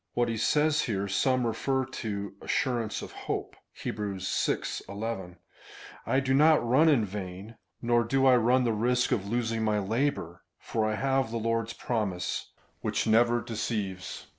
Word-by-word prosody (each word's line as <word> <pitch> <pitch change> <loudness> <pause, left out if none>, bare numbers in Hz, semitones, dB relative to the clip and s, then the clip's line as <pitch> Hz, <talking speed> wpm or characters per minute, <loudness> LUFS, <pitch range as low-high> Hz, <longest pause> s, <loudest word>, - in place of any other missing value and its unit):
What 120 -1 +2
he 115 - -2
says 150 +6 +2
here 100 -4 -1
some 130 +5 +1
refer 130 +4 0
to 105 -6 -5
assurance 120 -5 -1
of - - -8
hope - - -4
— - - -15
(Heb. - - -3
vi. 95 -10 -1 0.2
11) 100 -3 -5 0.3
— - - -16
"I 130 - +3
do 135 -1 0
not 150 -2 +5
run 150 +7 +5
in 125 -8 +4
vain, 95 +2 -7 0.3
nor 120 0 +3
do 135 +4 +1
I 130 -1 +7
run 125 +2 +3
the 115 -2 +1
risk 125 +3 +1
of 100 -3 0
losing 115 -1 0
my 105 -1 +2
labour, 105 - -1 0.2
for 110 -1 -1
I 110 - -1
have 135 0 +1
the 115 - -3
Lord's 115 0 -1
promise, 105 -9 -2 0.3
which - - -1
never 120 +2 +4
deceives." 105 -4 -4
115 Hz, 165 wpm, -28 LUFS, 105-125 Hz, 0.3 s, I